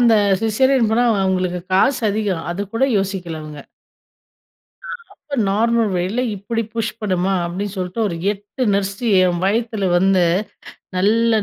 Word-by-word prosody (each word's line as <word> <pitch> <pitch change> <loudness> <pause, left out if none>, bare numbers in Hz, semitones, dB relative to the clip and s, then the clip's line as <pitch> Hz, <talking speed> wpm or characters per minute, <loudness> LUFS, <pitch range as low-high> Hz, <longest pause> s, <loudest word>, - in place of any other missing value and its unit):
அந்த 235 -2 +5 0.3
சிசேரியன் 235 +2 +2
போனா, 235 +2 +3 0.2
அவுங்களுக்கு 185 -1 0
காசு 245 +9 +3
அதிகம், 200 -5 -2
அது 185 +4 -3
கூட 230 - +2
யோசிக்கல 185 -5 -4
அவுங்க. 150 -2 -9 1.3
அ - - -5 0.2
அப்ப 285 -2 -8
நார்மல் 225 +2 +2
வேல 190 +8 -1
இப்பிடி 225 +4 -3
புஷ் 225 -1 -2
பண்ணுமா, 190 -2 0
அப்பிடின்னு 190 +4 -4
சொல்ட்டு, 185 +4 -3
ஒரு 170 - -4 0.2
8 205 +5 -5
நர்ஸ் 200 0 -1 0.3
என் 175 -2 +1
வயித்தில 215 -1 0
வந்து 185 0 +3 0.7
நல்லா 220 +4 +3
200 Hz, 135 wpm, -19 LUFS, 185-225 Hz, 1.3 s, அந்த